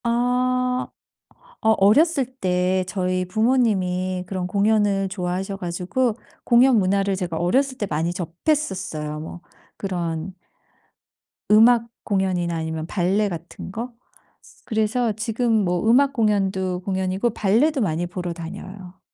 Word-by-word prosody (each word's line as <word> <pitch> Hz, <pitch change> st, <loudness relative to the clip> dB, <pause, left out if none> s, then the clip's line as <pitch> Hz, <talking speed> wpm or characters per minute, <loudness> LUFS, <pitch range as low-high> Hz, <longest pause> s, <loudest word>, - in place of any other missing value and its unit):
아 250 Hz, +1 st, +1 dB, 0.7 s
어 220 Hz, -, +3 dB
어렸을 275 Hz, -, +4 dB
때 185 Hz, -6 st, 0 dB
저희 185 Hz, -1 st, -1 dB
부모님이 185 Hz, -4 st, +1 dB
그런 185 Hz, -1 st, -3 dB
공연을 200 Hz, 0 st, +2 dB
좋아하셔 190 Hz, +1 st, -3 dB
가지고 185 Hz, +6 st, -1 dB, 0.3 s
공연 245 Hz, 0 st, +5 dB
문화를 195 Hz, 0 st, +1 dB
제가 175 Hz, -4 st, -3 dB
어렸을 260 Hz, +10 st, +1 dB
때 205 Hz, -, -1 dB
많이 165 Hz, +2 st, -1 dB
접했었어요. 180 Hz, -, -2 dB
뭐 160 Hz, +2 st, -8 dB, 0.4 s
그런 175 Hz, -2 st, -3 dB, 1.2 s
음악 230 Hz, +2 st, +6 dB, 0.2 s
공연이나 185 Hz, -4 st, 0 dB
아니면 160 Hz, 0 st, -3 dB
발레 200 Hz, +3 st, +1 dB
같은 170 Hz, +1 st, -8 dB
거. 235 Hz, +5 st, -5 dB, 0.7 s
그래서 220 Hz, +2 st, 0 dB
지금 225 Hz, +3 st, -1 dB
뭐 180 Hz, +5 st, 0 dB
음악 275 Hz, +4 st, +4 dB
공연도 195 Hz, -5 st, 0 dB
공연이고 190 Hz, +4 st, -1 dB
발레도 240 Hz, +9 st, +2 dB
많이 175 Hz, -4 st, 0 dB
보러 175 Hz, -1 st, -4 dB
다녀요. 185 Hz, +2 st, -9 dB
195 Hz, 265 characters per minute, -22 LUFS, 180-230 Hz, 1.2 s, 음악